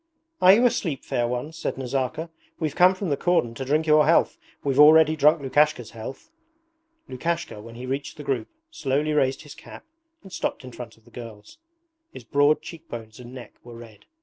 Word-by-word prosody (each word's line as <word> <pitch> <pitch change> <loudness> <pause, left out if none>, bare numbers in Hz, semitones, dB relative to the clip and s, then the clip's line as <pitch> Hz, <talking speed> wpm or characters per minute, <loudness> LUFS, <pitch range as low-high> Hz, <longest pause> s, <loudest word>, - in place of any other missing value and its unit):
'Are 185 +1 +8
you 235 +5 +4
asleep, 165 - -1
fair 120 -1 -1
ones?' 135 +7 -5
said - - -3
Nazarka. 135 +5 -3 0.3
'We've 155 -3 -2
come 185 +1 +5
from 185 -1 -4
the 145 - +1
cordon 175 -10 +1
to 135 - -6
drink 150 +4 0
your 150 -1 +4
health. 165 - +3 0.2
We've 140 -1 0
already 155 +1 +7
drunk 150 0 +3
Lukashka's 135 -3 +1
health.' 125 - -9 0.8
Lukashka, 165 -3 -4
when 115 +2 -12
he 125 +2 -8
reached 135 +4 -4
the 150 - -8
group, 130 -6 -2 0.2
slowly 150 - -1
raised 135 -1 +1
his 145 - -11
cap - - -13 0.4
and 190 -2 -13
stopped - - -3
in 130 - -10
front 120 -2 -10
of 115 - -27
the 120 - -20
girls. 115 - -11 0.5
His - - -11
broad 145 +1 +2
cheekbones 115 -9 -10
and 120 0 -11
neck 120 -4 -10
were 120 -1 -12
red. 115 -2 -14
140 Hz, 190 wpm, -24 LUFS, 120-160 Hz, 0.8 s, Are